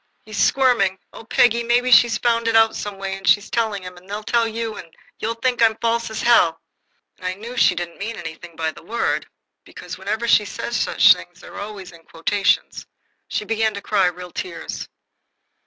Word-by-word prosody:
"He's 215 -2 -6
squirming. 240 -8 +3 0.2
Oh, - - -11
Peggy, 235 +1 +3
maybe 240 +2 +1
she's 235 -2 +6
found 230 0 +1
it 225 - +1
out 225 0 +5
some 205 -1 -5
way, 195 0 -4
and 195 - -9
she's 205 0 +3
telling 220 -4 -1
him, 180 0 -9
and 185 +2 -17
they'll 210 +1 -5
tell 230 +1 +1
you, 225 -1 -4
and 165 - -10 0.3
you'll 225 +1 -2
think 245 +1 -1
I 230 - +8
am 220 0 -5
false 230 0 0
as 220 - -5
hell!" 175 -9 +4 0.6
I 185 0 -3
knew 230 +5 -9
she - - +4
didn't 170 -1 -6
mean 225 +3 -4
anything 170 -1 -9
by 160 0 -2
that - - -15
word, 235 +2 -1 0.4
because - - -10
whenever 220 +3 -2
she 215 - +5
says 235 +3 -5
such - - +5
things - - -13
they're - - -10
always 200 -3 -8 0.2
quotations. 195 +5 0 0.4
She 210 - -3
began 220 0 0
to 200 - -6
cry 195 -4 +2
real 180 0 -6
tears. 370 - -6
215 Hz, 195 wpm, -21 LUFS, 190-230 Hz, 0.6 s, I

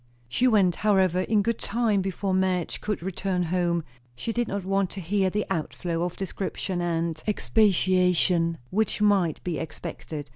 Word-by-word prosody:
She 190 - +2
went, 195 -7 +3
however, 190 -4 +3
in 210 +2 +2
good 230 +1 -1
time, 220 -3 +1
before 195 0 -2
Madge 185 -2 0
could 210 -5 -3
return 190 0 -1
home; 175 -1 0 0.3
she 225 - -3
did 240 0 0
not 200 -1 -3
want 195 -1 +1
to 195 - -7
hear 190 +2 +1
the 210 +3 -1
outflow 165 +1 -2
of 175 0 -2
description 190 -1 -3
and 165 -2 -1
expatiation 180 -5 +2
which 215 +2 0
might 200 -6 +2
be 175 -3 -2
expected. 155 -1 -6
185 Hz, 155 wpm, -26 LUFS, 170-205 Hz, 0.3 s, went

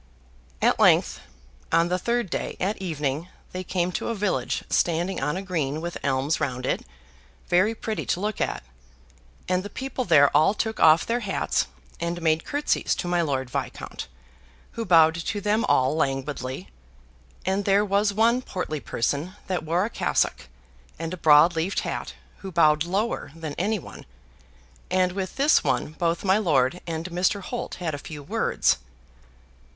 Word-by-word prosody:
At - - +3
length, - - +4 0.5
on 165 +1 +3
the 180 +1 0
third 235 -3 -1
day, - - -3
at 195 +2 -1
evening, 150 -2 -2 0.2
they 185 0 -4
came 180 -1 -1
to - - -3
a 230 - -1
village 205 -2 -1
standing 175 +1 0
on 150 +5 -1
a 190 - -4
green 155 -6 -2
with 170 +1 -5
elms 140 +2 0
round 125 -1 -2
it, - - 0 0.7
very 190 +6 +3
pretty 220 -1 -4
to - - 0
look 210 +1 -2
at; - - -1 0.8
and 185 0 +1
the 205 - -7
people 265 +1 -4
there 145 - +5
all 155 +8 +5
took 220 +1 -2
off 160 +1 +6
their 235 +1 0
hats, - - 0 0.3
and 170 +1 -2
made 160 -1 +1
curtsies 290 +1 0
to - - -4
my 175 0 +2
Lord 135 -5 -2
Viscount, - - -5 0.6
who 230 - -4
bowed 165 -3 +6
to 170 +5 -3
them 210 +3 +1
all 130 - +3
languidly; 135 - -2 0.8
and 190 +2 0
there 200 +1 +4
was 200 +1 +2
one 230 +4 +3
portly 180 -9 -4
person 145 - -2
that 185 -3 -1
wore 170 +4 +1
a - - -3
cassock 65 - 0 0.5
and 165 +2 -4
a - - -2
broad 160 +1 +6
leafed 165 +5 0
hat, - - -4 0.2
who 195 - -8
bowed 155 -2 +4
lower 195 0 -2
than 160 -3 -6
any 210 +4 +1
one 180 - -11 0.8
and 185 0 +2
with 190 0 -4
this 285 +3 +4
one - - 0
both 170 +1 -1
my 190 +2 +4
lord 150 -4 +2
and 165 0 -3
Mr. 185 +3 +1
Holt 245 - -5
had 170 -4 -3
a 145 - -4
few 150 0 -8
words. - - +1
175 Hz, 165 wpm, -25 LUFS, 155-200 Hz, 0.8 s, off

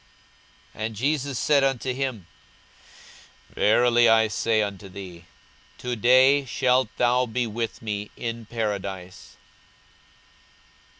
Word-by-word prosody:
42:023:043 110 - -7
And 110 0 -5
Jesus 140 +2 -1
said 145 0 +3
unto 130 -1 0
him, 130 -7 -4 1.3
Verily 120 +2 +3
I 110 -1 +4
say 110 0 +1
unto 100 -1 -6
thee, 90 -3 -10 0.5
To 125 -1 -4
day 130 +5 +5
shalt 130 +1 +1
thou 125 +1 +2
be 120 +2 -1
with 115 +1 -5
me 105 -1 -4
in 115 -1 -5
paradise. 100 -5 -5
115 Hz, 110 wpm, -24 LUFS, 105-125 Hz, 1.3 s, day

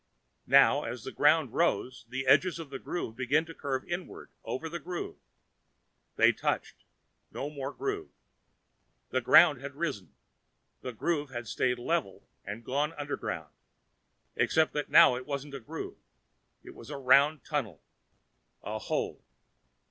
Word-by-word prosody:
Now, - - +6
as - - -5
the - - -6
ground - - +3
rose, 125 -3 0
the 130 +2 -3
edges 170 +7 +4
of 160 -4 -8
the 135 - -5
groove 145 -10 -4
began 140 +6 +1
to 165 - -10
curve 135 -4 -3
inward 175 +1 -6
over 160 +5 -4
the 170 +1 -5
groove. 175 +1 -5 1.0
They - - +6
touched. - - -3 0.4
No 145 - -5
more 140 -2 -5
groove. 405 - -4 1.0
The - - +1
ground 140 -4 +6
had 140 0 -7
risen, 140 - -4 0.7
the 125 - -5
groove 145 +4 -1
had 120 -3 -6
stayed 125 +3 0
level 125 - -2 0.2
and 105 +4 -7
gone 145 +4 0
underground. 145 -1 -5 0.8
Except 160 -1 +2
that 150 -1 -2
now 125 - +7
it 125 +2 -7
wasn't 140 0 -4
a 140 - -5
groove. 110 - -7 0.6
It - - -11
was - - -12
a 145 - -5
round 140 +3 +4
tunnel. 115 - -3 0.8
A - - -4
hole. - - -3
140 Hz, 145 wpm, -30 LUFS, 130-155 Hz, 1.0 s, now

